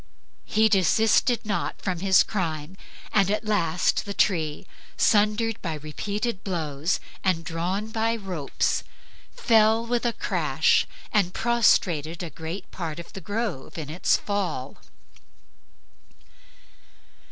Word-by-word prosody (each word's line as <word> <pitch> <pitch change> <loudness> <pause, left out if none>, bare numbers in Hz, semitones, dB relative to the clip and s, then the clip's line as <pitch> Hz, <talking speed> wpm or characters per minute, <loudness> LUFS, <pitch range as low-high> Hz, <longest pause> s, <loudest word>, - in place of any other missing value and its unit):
He 220 +1 +3
desisted 220 +5 +3
not 210 -1 -2
from 185 -3 -2
his 190 +1 +5
crime, 165 -4 -3 0.4
and 195 -2 +4
at 210 +2 -1
last 180 -5 +1
the 200 -1 -6
tree, 160 -6 +1 0.3
sundered 215 +1 +2
by 165 -4 -3
repeated 200 +8 -4
blows 160 -3 -1 0.2
and 180 -3 +1
drawn 180 +5 -2
by 225 +1 0
ropes, 185 -10 -2 0.5
fell 225 0 +4
with 240 0 0
a 240 -1 +1
crash - - +2 0.3
and 195 -4 +2
prostrated 180 -9 +2
a 165 - -6
great 160 +6 -7
part 165 -4 -5
of 170 - -9
the 195 - -7
grove 205 - -4
in 150 -2 -5
its 175 +3 +2
fall. 185 -10 -3
195 Hz, 120 wpm, -25 LUFS, 165-215 Hz, 0.5 s, his